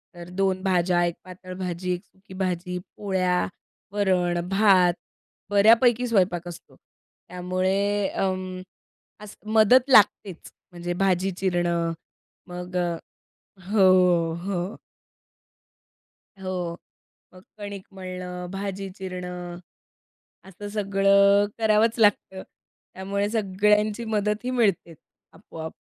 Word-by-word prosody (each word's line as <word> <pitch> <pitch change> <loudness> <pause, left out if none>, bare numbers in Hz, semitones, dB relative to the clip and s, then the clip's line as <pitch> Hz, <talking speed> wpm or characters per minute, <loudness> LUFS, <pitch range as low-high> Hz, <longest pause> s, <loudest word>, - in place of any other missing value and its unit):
तर 175 0 -10
2 190 0 0
भाज्या, 180 -2 +2
1 170 - -2
पातळ 185 0 -10
भाजी, 180 0 -3
1 180 +1 -6
सुकी 190 0 -18
भाजी, 180 -1 -2 0.2
पोळ्या, 185 -3 0 0.4
वरण, 185 -4 +1
भात, 195 -3 +4 0.6
बऱ्यापैकी 230 +4 +4
स्वयंपाक 180 -6 +1
असतो. 175 - -11 0.5
त्यामुळे 190 +3 -1
अं, 185 -1 -3 0.6
असं 210 +1 -12
मदत 245 +5 +5
लागतेच, 205 -6 +3 0.2
म्हणजे 175 0 -4
भाजी 190 0 +1
चिरणं, 175 -3 0 0.5
मग 180 0 -8
अ, 175 -1 -1 0.7
हो, 180 -5 +4
हो. 190 0 -3 1.7
हो, 180 -2 -3 0.6
मग 185 - -15 0.2
कणिक 200 -2 -7
मळणं, 180 -1 -7
भाजी 195 0 -5
चिरणं, 180 -2 -6 0.9
असं 195 +2 -9
सगळं 200 0 +4
करावंच 220 +1 +2
लागतं, 205 -3 +2 0.5
त्यामुळे 200 +2 -2
सगळ्यांची 210 +1 +1
मदतही 215 +2 -1
मिळते, 205 -9 0 0.4
आपोआप. 160 0 -9
190 Hz, 95 wpm, -24 LUFS, 180-205 Hz, 1.7 s, मदत